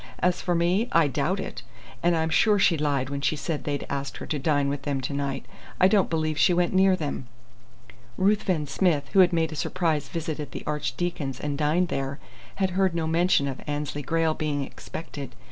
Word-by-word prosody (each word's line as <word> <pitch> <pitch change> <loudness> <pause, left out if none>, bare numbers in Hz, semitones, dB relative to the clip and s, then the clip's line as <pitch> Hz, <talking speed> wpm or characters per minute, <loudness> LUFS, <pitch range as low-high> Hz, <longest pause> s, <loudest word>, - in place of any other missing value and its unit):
As 180 0 +1
for 175 -2 0
me, 180 +7 +2
I 165 -3 +5
doubt 135 - 0
it. - - -5 0.4
And 170 -1 +3
I'm 160 0 0
sure 210 +5 +4
she 190 -3 +4
lied 140 -3 0
when 140 0 -3
she 150 - +1
said 155 0 -3
they'd 145 -1 -2
asked 140 0 -4
her - - -7
to 150 - -2
dine 145 0 +2
with 140 0 -2
them 140 -1 -2
to 130 +2 -4
night. 140 -1 -2 0.3
I 185 - +7
don't 200 -1 +3
believe 155 -2 -1
she 175 - +5
went 175 +1 +1
near 190 0 +5
them." 145 -6 -4 0.9
Ruthven 190 -5 +2
Smith, 150 -1 +1
who 195 - +5
had 180 -2 +7
made 165 -2 +1
a - - -5
surprise 160 0 -1
visit 160 -2 -4
at 150 - -6
the - - -6
Archdeacon's 150 -2 -2
and 145 -1 -2
dined 155 +5 +1
there, 135 -2 -2 0.4
had 190 -1 0
heard 185 -1 +1
no 165 -1 0
mention 165 -2 +2
of 135 -1 -5
Annesley 145 0 -3
Grayle 160 +2 +1
being 150 -2 -2
expected. 140 0 -8
155 Hz, 205 wpm, -26 LUFS, 145-175 Hz, 0.9 s, I